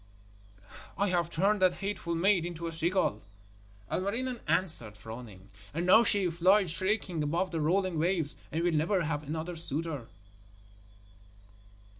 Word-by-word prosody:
'I 200 0 +1
have 175 -2 0
turned 195 +5 +1
that 185 -1 +4
hateful 195 -3 -4
maid 185 +1 +3
into 170 -1 -5
a 165 - -4
seagull,' 165 - 0 0.7
Ilmarinen 235 +6 -2
answered, 120 - +2
frowning, 105 -3 -10 0.3
'and 170 +2 -1
now 220 +6 +7
she 200 -5 +3
flies 185 +2 +3
shrieking 190 -2 0
above 170 +5 -1
the 165 -2 -2
rolling 180 +1 +1
waves, 165 -3 +1 0.2
and 165 +2 -1
will 175 - +2
never 170 +4 +1
have 150 -2 -2
another 160 +4 -5
suitor.' 155 -5 -4
170 Hz, 135 wpm, -30 LUFS, 155-190 Hz, 0.7 s, now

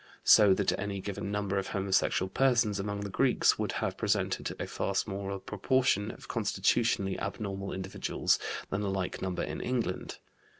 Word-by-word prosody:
So 100 -3 +7
that 100 -1 0
any 100 -1 -3
given 100 +1 -4
number 100 -1 0
of 95 - -4
homosexual 95 -1 +1
persons 115 -2 +2
among 100 +1 -3
the 100 - -4
Greeks - - +3
would - - -1
have - - -2
presented - - 0
a - - -2
far 100 - -3
smaller 100 -1 -2
proportion 105 +1 +1
of - - -10
constitutionally 100 -1 +1
abnormal 100 0 -4
individuals 95 0 0 0.3
than 100 - -1
a 100 - -1
like 95 -1 -3
number 95 -1 -2
in - - -4
England. 125 -2 -2
100 Hz, 160 wpm, -30 LUFS, 95-105 Hz, 0.3 s, So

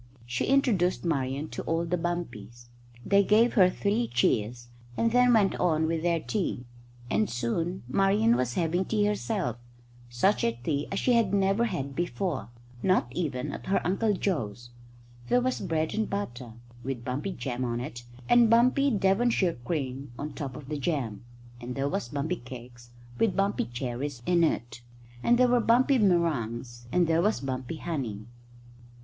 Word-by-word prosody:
She 120 0 -2
introduced 215 -11 +2
Marian 140 -2 -1
to - - -5
all 165 +1 0
the 170 +2 0
bumpies. 120 - -5 0.4
They 200 0 +4
gave 220 +4 +4
her 185 -5 +6
three 210 +5 0
cheers, 120 0 0 0.3
and 230 0 +2
then 250 +1 +5
went 210 -4 +4
on 160 -3 +2
with 160 0 -1
their 170 0 +1
tea, 165 - -3 0.5
and 105 +1 +2
soon 130 +11 -2
Marian 200 - +3
was 125 -1 -1
having 175 +2 +1
tea 210 0 +1
herself 210 - -1 0.5
such 125 +13 +2
a 115 - +2
tea 140 +5 -2
as 195 - -2
she 250 - +2
had 220 -4 +3
never 195 +4 +2
had 140 - -3
before, 175 -3 -2 0.3
not 185 -9 +2
even 140 -6 -2
at - - -8
her 195 - +2
Uncle 205 +3 +1
Joe's. 120 - -3 0.6
There 245 - +4
was 255 +1 -1
bread 160 -4 -1
and 220 0 -1
butter 125 - -4 0.3
with 125 -2 -4
bumpy 145 +10 -3
jam 125 -1 -4
on 120 -1 -1
it 120 -1 -6 0.2
and 240 -2 +6
bumpy 255 +5 +4
Devonshire 195 - +2
cream 135 -2 -3
on 145 +2 -4
the - - -12
top 140 -5 -5
of 150 -3 -9
the 150 0 -3
jam, 125 -9 -2 0.4
and 120 +1 -6
there 135 +1 0
was 120 -4 -2
bumpy 150 +6 -2
cake 120 0 -10 0.4
with 225 -4 +2
bumpy 195 +1 +1
cherries 125 +1 -5
in 175 -1 +3
it, 120 -6 -1 0.4
and 240 - +4
there 250 0 +5
were 245 0 +3
bumpy 250 +4 +4
meringues, 120 - 0
and 180 -1 +3
there 165 0 +2
was 210 +4 +1
bumpy 130 +2 -4
honey. 125 -12 -4
165 Hz, 165 wpm, -28 LUFS, 125-200 Hz, 0.6 s, her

